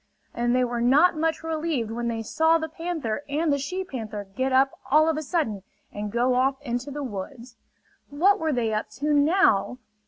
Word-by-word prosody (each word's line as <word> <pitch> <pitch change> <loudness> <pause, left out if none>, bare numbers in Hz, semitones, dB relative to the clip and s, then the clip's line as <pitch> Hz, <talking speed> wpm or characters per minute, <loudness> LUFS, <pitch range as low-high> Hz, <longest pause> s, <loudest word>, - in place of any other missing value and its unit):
And 240 +1 0
they 255 - +3
were 240 -1 -2
not 290 +9 +4
much 320 +1 -1
relieved 315 -8 -2
when 235 +1 -3
they 225 -1 -2
saw 320 +8 +3
the 320 0 -4
panther 320 -7 -4
and 300 +1 +1
the 280 - 0
she 365 +8 -3
panther 220 - -6
get 260 +1 0
up 265 +1 +4 0.2
all 305 +3 +5
of 320 - +1
a 310 - -2
sudden 290 - -1 0.3
and 205 0 -5
go 245 +3 +2
off 265 +2 +1
into 245 +1 -3
the 290 +1 -5
woods. 235 +2 -7 0.5
What 360 +8 +3
were 320 -1 0
they 235 -5 0
up 215 - -2
to 295 +2 0
now? 290 - +3
270 Hz, 195 wpm, -25 LUFS, 235-315 Hz, 0.5 s, all